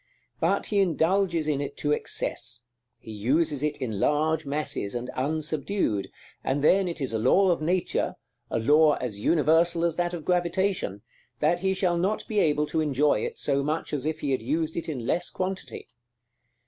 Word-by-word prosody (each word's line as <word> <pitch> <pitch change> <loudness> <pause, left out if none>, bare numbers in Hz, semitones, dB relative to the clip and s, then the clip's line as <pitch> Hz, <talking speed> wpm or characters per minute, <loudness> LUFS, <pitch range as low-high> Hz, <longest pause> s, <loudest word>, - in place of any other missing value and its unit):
But - - +1
he 200 - +3
indulges 175 -2 +2
in 145 -2 0
it 140 - -5
to 150 - -1
excess; 120 -4 -2 0.4
he 110 - -10
uses 140 +7 0
it 150 0 -1
in 110 -7 -3
large 155 +2 +1
masses, 140 -8 -2
and 120 +1 -4
unsubdued; 150 - -1 0.4
and 140 +2 -1
then 190 +4 +4
it 170 -1 -4
is 135 -5 -3
a 110 - 0
law 190 - +4
of 170 - 0
Nature, 175 +3 0 0.3
a - - -1
law 150 +6 +5
as 115 -5 -5
universal 165 +5 +3
as 165 -2 -1
that 175 0 0
of 160 -3 -8
gravitation, 175 - 0 0.4
that 165 +4 +2
he 190 +1 0
shall 175 -2 +1
not 195 +5 -1
be 215 -2 0
able 150 -4 +2
to 160 +1 -1
enjoy 150 -1 +2
it 465 0 -4
so 140 - 0
much 150 +3 -2
as 145 0 -1
if 160 0 -3
he 140 - -1
had 130 - 0
used 155 +6 -1
it 165 - -3
in 130 -7 -4
less 170 +7 0
quantity. 185 +1 -5
155 Hz, 185 wpm, -26 LUFS, 140-175 Hz, 0.4 s, law